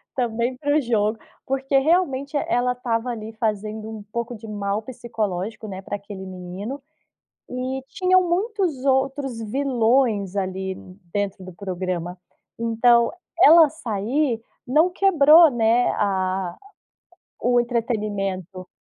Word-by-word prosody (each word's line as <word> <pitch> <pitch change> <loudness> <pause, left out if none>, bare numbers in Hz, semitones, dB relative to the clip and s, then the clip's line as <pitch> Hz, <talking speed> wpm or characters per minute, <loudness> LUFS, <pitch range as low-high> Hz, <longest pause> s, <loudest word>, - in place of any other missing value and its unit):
também 240 0 -1
pro 290 +2 +2
jogo. 220 -2 +1 0.3
Porque 270 +1 -1
realmente 285 -3 +1
ela 250 +1 +1
estava 240 -1 -2
ali 220 -2 -5
fazendo 215 0 -3
um 215 -2 -8
pouco 235 +1 -3
de 220 +1 -11
mal 205 0 -2
psicológico, 220 -4 -4
né, 190 -2 -6
pra 195 - -5
aquele 200 -1 -8
menino. 185 +8 -6 0.7
E 255 +1 -3
tinham 370 -2 +2
muitos 365 - -1
outros 270 -2 0
vilões 230 -4 +1
ali 190 -1 -2 0.4
dentro 200 -2 -2
do 185 - -9
programa. 180 -1 -4 0.4
Então, 235 +1 +3 0.3
ela 325 -2 +8
sair 240 -1 -1 0.2
não 310 +8 +3
quebrou, 335 -4 +6
né, 235 0 +2
a 190 -2 -1 0.9
o 245 0 +4
entretenimento. 205 -6 -2
230 Hz, 115 wpm, -23 LUFS, 205-270 Hz, 0.9 s, ela